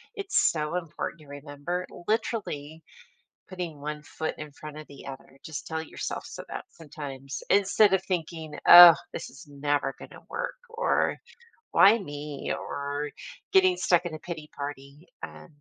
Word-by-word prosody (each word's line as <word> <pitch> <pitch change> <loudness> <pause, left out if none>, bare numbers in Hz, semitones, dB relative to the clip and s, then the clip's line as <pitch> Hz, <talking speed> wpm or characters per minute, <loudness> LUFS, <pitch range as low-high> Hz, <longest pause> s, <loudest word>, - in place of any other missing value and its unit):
it's 400 -1 +2
so 155 +1 -2
important 170 -1 -5
to 150 - -16
remember 145 +5 -5 0.2
literally 165 -9 -2 0.7
putting 175 -6 -6
one 150 0 -4
foot 145 +2 -4
in 150 -1 -8
front 150 +1 -10
of 155 - -8
the 140 - -12
other. 135 0 -10
Just 160 -1 -6
tell 160 0 -2
yourself 160 - -5
so - - -8
that - - -6
sometimes 140 -4 -8
instead 200 0 +5
of 190 - -2
thinking, 165 -4 -3
"Oh, 175 -1 +13 0.2
this - - -6
is 150 +3 -14
never 145 -1 -1
gonna - - -11
work," - - -3 0.2
or 465 +2 +1 0.5
"Why 205 +4 +7
me?" 145 -5 -5
or 145 +1 -4 0.4
getting 375 -2 +5
stuck 175 - +3
in 160 - -4
a 155 - -6
pity 160 -3 -7
party 140 +2 -7 0.2
um, 75 -1 -8
155 Hz, 155 wpm, -27 LUFS, 145-175 Hz, 0.7 s, Oh